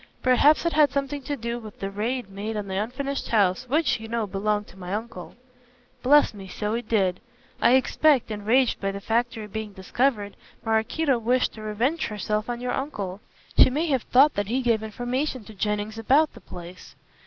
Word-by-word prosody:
"Perhaps 285 +6 +4
it 335 - +1
had 300 -1 +5
something 280 +1 -2
to 290 +2 -3
do 235 0 -4
with 215 -3 -11
the 195 0 -4
raid 230 +3 -2
made 205 +3 -5
on 205 -1 -4
the 190 - -5
unfinished 260 +7 -3
house 215 +3 +1
which, 270 -3 +2
you 225 - -8
know, 230 -1 -1
belonged 210 +1 -1
to - - -16
my 180 -1 -8
uncle." 225 +2 -7 0.7
"Bless 290 +1 +5
me, 195 -2 -10
so 210 +3 -3
it 235 -1 -4
did. 190 -5 +1 0.4
I 235 - +5
expect, 265 -1 +3
enraged 225 +5 +1
by 195 0 0
the 200 - -6
factory 225 +1 -1
being 210 0 -6
discovered, 205 +2 -1 0.3
Maraquito 235 +5 +1
wished 250 +3 +1
to 220 - -10
revenge 230 +10 -1
herself 210 +1 -2
on 240 0 -3
your 250 0 -2
uncle. 205 -9 -4 0.4
She - - +9
may 300 +6 0
have 265 -4 +2
thought 275 +6 +5
that 205 -1 -2
he 255 +4 -1
gave 230 -3 +2
information 245 +4 -3
to 220 - -12
Jennings 210 +2 -2
about 285 +7 +3
the - - -14
place." 175 +1 -11
225 Hz, 190 wpm, -25 LUFS, 210-260 Hz, 0.7 s, She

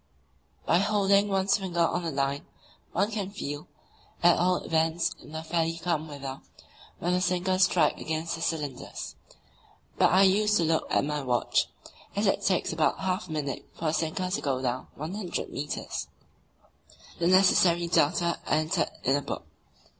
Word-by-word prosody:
By 170 - +4
holding 200 0 +3
one's 195 +1 +2
finger 180 -3 -2
on 170 +1 +2
the 170 - -2
line 140 -1 -1 0.4
one 200 +5 +1
can 205 -3 -3
feel, 145 -7 -6 0.6
at 175 0 +7
all 180 +1 +2
events 165 +1 +1
in - - -13
fairly 165 0 0
calm 165 -2 -1
weather, 140 -2 -7 0.6
when 175 +2 -1
the 180 - +1
sinkers 185 +1 +2
strike 170 -5 +2
against 160 +1 -2
the 165 - -5
cylinders; 150 -6 -4 0.8
but - - +6
I 190 +2 +6
used 210 +2 +4
to 170 - +2
look 160 0 +1
at - - +2
my 150 0 -2
watch, 125 -3 +1 0.5
as 205 +2 +1
it 195 - +2
takes 185 -3 +1
about 160 +3 +1
half 185 0 -1
a - - -9
minute 145 -4 -3
for 165 - -6
the 155 - +2
sinker 165 +3 -1
to 195 - -1
go 135 -3 0
down 130 0 -2
100 180 +5 -4
metres. 145 +1 -4 1.1
The 170 - +2
necessary 180 -2 +5
data 170 +1 +2
are - - 0
entered 155 +1 +1
in 135 - +3
a 145 - 0
book. - - -5
170 Hz, 165 wpm, -28 LUFS, 155-185 Hz, 1.1 s, at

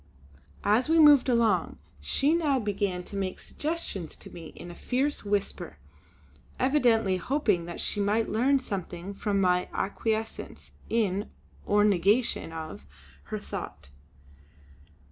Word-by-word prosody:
As 225 +8 +3
we 325 - +4
moved 295 -4 +7
along 235 -2 +2 0.2
she 285 +3 +1
now 310 -5 +2
began 200 -5 -1
to 200 - -9
make 190 -2 -2
suggestions 295 - -4
to - - -12
me 165 -2 -9
in 175 - -9
a - - -9
fierce 265 +10 -1
whisper, 200 - -2 0.8
evidently 235 -8 +3
hoping 205 - 0
that 170 - -7
she - - 0
might 210 +3 +1
learn 260 +6 +3
something 195 -6 -5
from 200 0 -1
my 180 -1 +2
acquiescence 220 +2 -3 0.2
in, 205 -3 0 0.4
or 205 0 +4
negation 205 0 +2
of, 155 - -7 0.4
her - - -4
thought. 70 - -7
205 Hz, 125 wpm, -28 LUFS, 185-255 Hz, 0.8 s, moved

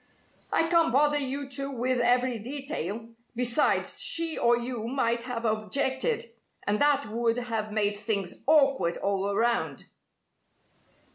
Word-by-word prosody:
"I 325 - +2
can't 335 -1 +3
bother 295 +2 +3
you 275 0 -3
two 275 0 -2
with 255 -1 -1
every 245 0 +2
detail. 235 - -4 0.3
Besides, 245 +4 +1
she 330 -1 +3
or 235 0 +3
you 240 -2 -4
might 235 -2 0
have 240 -2 -4
objected, 265 - 0 0.4
and 205 +1 0
that 290 -1 +3
would 230 +2 -1
have 225 -3 -3
made 210 -1 +1
things 205 -3 -3
awkward 275 - +3
all 200 0 -1
around." 235 +3 0
245 Hz, 130 wpm, -27 LUFS, 220-275 Hz, 0.4 s, can't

